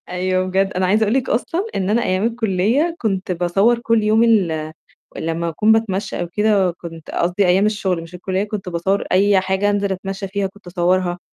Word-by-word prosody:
أيوه، 185 +1 -1
بجد 190 +1 0
أنا 185 0 0
عايزة 210 +4 +3
أقول 215 +1 +1
لِك 265 -1 0
أصلًا 330 - -1
إن 190 0 -1
أنا 230 +3 +2
أيام 185 +2 0
الكلية 230 - 0
كنت 195 -4 -1
باصور 195 +7 +2
كل 230 -2 +1
يوم 215 +2 +3
ال 165 -9 +1 0.4
لمّا 165 +1 -2
أكون 210 +7 +2
باتمشى 215 -3 0
أو 175 - -2
كده، 200 0 +2
كنت 165 -2 -11
قصدي 180 +3 +1
أيام 190 +3 +3
الشغل، 195 -5 -1
مش 165 +2 -11
الكلية، 190 +2 -2
كنت 205 -3 -5
باصور 180 +3 0
أي 195 +1 +4
حاجة 190 +2 0
أنزل 200 -1 0
أتمشى 195 +1 -4
فيها، 195 0 -2
كنت 195 0 -18
اصورها. 175 0 0
195 Hz, 190 wpm, -19 LUFS, 180-210 Hz, 0.4 s, أي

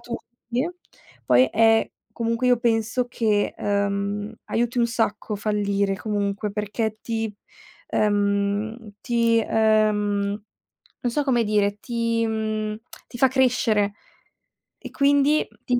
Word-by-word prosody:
tutti. 240 +3 -5 0.6
Poi 125 +1 +5
è 225 0 +4 0.2
comunque 230 +1 0
io 245 -1 +4
penso 230 +1 0
che, 220 -4 0
ehm, 200 +1 -1
aiuti 240 +2 -1
un 235 - +4
sacco 220 -2 -1
fallire 200 -1 0
comunque, 205 0 -2
perché 215 +1 -3
ti 225 -2 -2 0.6
ehm 205 +2 0
ti 230 -1 +2
ehm 210 -2 +1 0.6
non 245 - -1
so 295 +5 0
come 245 -4 +2
dire, 205 -1 +1
ti 230 -1 -1
mhmm, 215 -1 -2 0.3
ti 240 - -10
fa 265 - +5
crescere 235 -6 +2 0.9
e - - -9
quindi 285 +1 +3 0.2
ti 250 - +1
220 Hz, 115 wpm, -24 LUFS, 205-235 Hz, 0.9 s, Poi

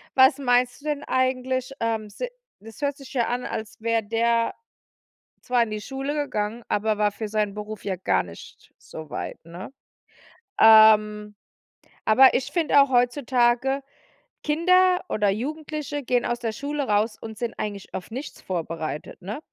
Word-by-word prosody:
was 265 +1 +6
meinst 245 -1 +1
du - - -17
denn 295 -1 -2
eigentlich? 260 0 -1
Ähm, 225 -2 -2
se 205 - -5 0.3
das 220 0 -13
hört 285 -1 0
sich 275 -3 -12
ja 240 -4 +1
an, 245 +1 -2
als 220 0 -6
wäre 230 0 +1
der 230 +2 +1 0.9
zwar 245 -1 +2
in 230 - -2
die 215 0 -4
Schule 270 +5 -4
gegangen, 230 -6 -2
aber 215 0 0
war 210 -1 +3
für 215 +1 -6
seinen 210 -1 -1
Beruf 210 0 -7
ja 190 -2 -2
gar 185 - +1
nicht 85 -1 -13
so 160 -1 -10
weit, - - -5
ne? 175 +8 -9 0.9
Ähm, 210 -1 +6 0.7
aber 260 +5 +7
ich 255 - -1
finde 315 -5 +4
auch 275 - +2
heutzutage, 250 +1 +2 0.6
Kinder 365 +4 +4
oder 205 -2 +1
Jugendliche 290 +5 -4
gehen 245 -1 0
aus 240 - -1
der 230 -2 -3
Schule 285 +4 -3
raus 215 0 +1
und 220 -1 -8
sind 235 -2 -3
eigentlich 205 -2 -5
auf 185 - -6
nichts 260 +6 -7
vorbereitet, 165 -4 -5
ne? 205 +7 -5
235 Hz, 160 wpm, -24 LUFS, 210-270 Hz, 0.9 s, aber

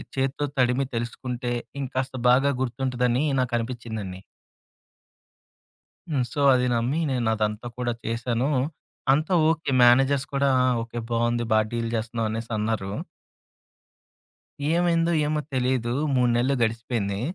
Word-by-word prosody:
చేత్తో 135 +2 0
తడిమి 130 +1 +2
తెలుసుకుంటే, 120 +1 -3 0.3
ఇంకాస్త 130 0 -3
బాగా 135 +3 +4
గుర్తుంటుందని 125 0 0 0.2
నాకనిపిచ్చిందండి. 115 -6 -4 1.9
హ్మ్. 140 -4 +1
సో, 145 - -2
అది 125 0 +2
నమ్మి 125 +7 0
నేనదంతా 110 -2 -1
కూడా 120 -1 0
చేశాను. 120 +3 -1 0.6
అంతా 155 +6 +1 0.2
ఓకే. 165 -3 -1
మేనేజర్స్ 135 +3 +5
కూడా 140 0 +2 0.3
ఓకే 115 +1 -7
బావుంది. 120 0 +1
బాగా 110 0 +3
డీల్ 115 -1 -2
చేస్తున్నాం 115 0 -2
అనేసన్నారు. 110 -2 -2 1.8
ఏమైందో! 170 -1 +2
ఏమో! 150 0 0
తెలీదు. 125 -2 0 0.2
3 125 -1 +3
నెలలు 130 +3 +2
గడిసిపోయింది. 115 -3 -1
120 Hz, 105 wpm, -25 LUFS, 115-135 Hz, 1.9 s, మేనేజర్స్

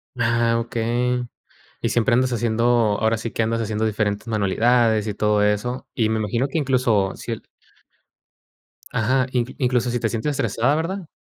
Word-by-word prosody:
Ah, 115 -1 +2
okey. 120 +2 -1 0.5
Y - - 0
siempre 120 +1 +2
andas 125 +1 +2
haciendo, 115 -1 0 0.4
ahora 110 +1 +1
sí, 115 +1 -5
que - - -1
andas 115 +1 0
haciendo 110 0 -1
diferentes 105 0 -1
manualidades, 110 +1 +2
y 105 - -2
todo 105 0 +2
eso, 105 +5 -1
y 110 -3 +1
me 110 0 0
imagino 115 +5 0
que 140 - -3
incluso 125 -9 +1
si - - -7
el - - -4 1.5
Ajá, 130 +3 +1
inclu 125 0 -1
incluso 125 -2 +1
si 120 - -1
te 115 - 0
sientes 115 +7 -2
estresada, 130 0 +1
¿verdad? 170 +3 -3
115 Hz, 165 wpm, -22 LUFS, 110-125 Hz, 1.5 s, Ah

